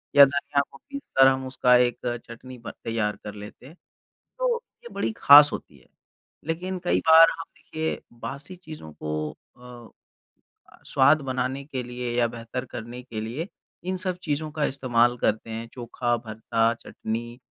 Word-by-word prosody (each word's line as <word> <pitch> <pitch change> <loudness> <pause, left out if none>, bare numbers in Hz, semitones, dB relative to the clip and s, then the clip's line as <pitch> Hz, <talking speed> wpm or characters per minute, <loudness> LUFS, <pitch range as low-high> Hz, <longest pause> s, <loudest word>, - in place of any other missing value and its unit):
या 140 - +11
धनिया 140 +1 0
को - - -13
पीस 280 - -8 0.2
कर 135 - +9
हम 130 0 +1
उसका 125 -1 +4
एक 125 0 +2 0.3
चटनी 125 +2 -10
बन 115 0 -8
तैयार 110 -2 -1
कर 105 - -6
लेते 105 +4 -11
हैं। 160 - -14 0.6
तो - - +2 0.3
ये 475 - -9
बड़ी 115 - -1
ख़ास 145 +1 +9
होती - - -7
है - - -25 0.6
लेकिन 180 +3 -2
कई 175 - +2
बार 160 +1 +10
हम - - -5
देखिए 155 +1 -4 0.2
बासी 145 +9 -7
चीज़ों 155 - -10
को 75 0 -2 0.3
अ, 125 -1 -12 1.0
स्वाद 145 +2 +4
बनाने 130 +2 -2
के 135 -4 -4
लिए 125 0 -5
या 120 - +3
बेहतर 115 +2 -6
करने 120 +1 -8
के 115 -4 -6
लिए 125 +10 -4 0.4
इन 185 - -1
सब 185 -1 -3
चीज़ों 155 0 -2
का 150 -1 0
इस्तेमाल 120 -3 +2
करते 110 0 0
हैं 115 +1 -5
चोखा, 120 0 -1
भरता, 115 0 0
चटनी 120 +1 -6
125 Hz, 165 wpm, -25 LUFS, 115-150 Hz, 1.0 s, या